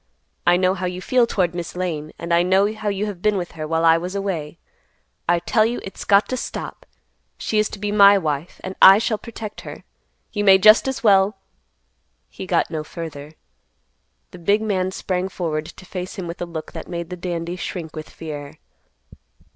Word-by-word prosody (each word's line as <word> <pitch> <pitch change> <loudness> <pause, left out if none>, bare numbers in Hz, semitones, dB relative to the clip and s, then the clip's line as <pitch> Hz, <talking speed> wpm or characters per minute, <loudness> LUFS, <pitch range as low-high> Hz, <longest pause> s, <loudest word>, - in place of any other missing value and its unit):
I 175 0 +6
know 185 0 +2
how 185 -1 -3
you 180 0 -5
feel 245 +5 +2
toward 180 -6 0
Miss 175 -1 -6
Lane, 160 -4 -3
and 170 0 -3
I 170 - +5
know 190 +4 +3
how 215 -1 -3
you 200 +1 -1
have 200 -4 -6
been 210 0 +2
with 175 -2 -4
her 155 -1 -6
while 165 +1 +1
I 165 0 +6
was 180 +3 -5
away. 170 -6 -3 0.7
I 175 - +5
tell 215 +5 +2
you 235 +2 -1
it's 195 - -8
got 200 +1 +4
to 255 - -1
stop. - - -6 0.5
She 215 - 0
is 215 - +1
to - - -8
be 205 +1 -3
my 200 -1 +7
wife, 155 -2 -3
and 190 - -5
I 195 +1 +10
shall 220 0 -1
protect 225 -3 -8
her. - - -9 0.5
You 205 -1 -1
may 195 -1 +7
just 215 +6 +6
as 265 -1 -3
well—" 195 -1 +4 0.9
He 190 - -8
got - - +1
no 155 -2 -3
further. 155 -2 -8 1.0
The 180 - -11
big 205 +5 +2
man 190 -4 0
sprang 185 0 -2
forward 155 -4 -3
to 190 - -13
face 185 0 -6
him 185 - -5
with 170 +1 -7
a 175 - -3
look 160 -2 -7
that - - -8
made 170 -1 -5
the - - -3
dandy 175 -1 -4
shrink 170 -3 -6
with 155 0 -7
fear. 150 -2 -8
185 Hz, 200 wpm, -22 LUFS, 170-200 Hz, 1.0 s, I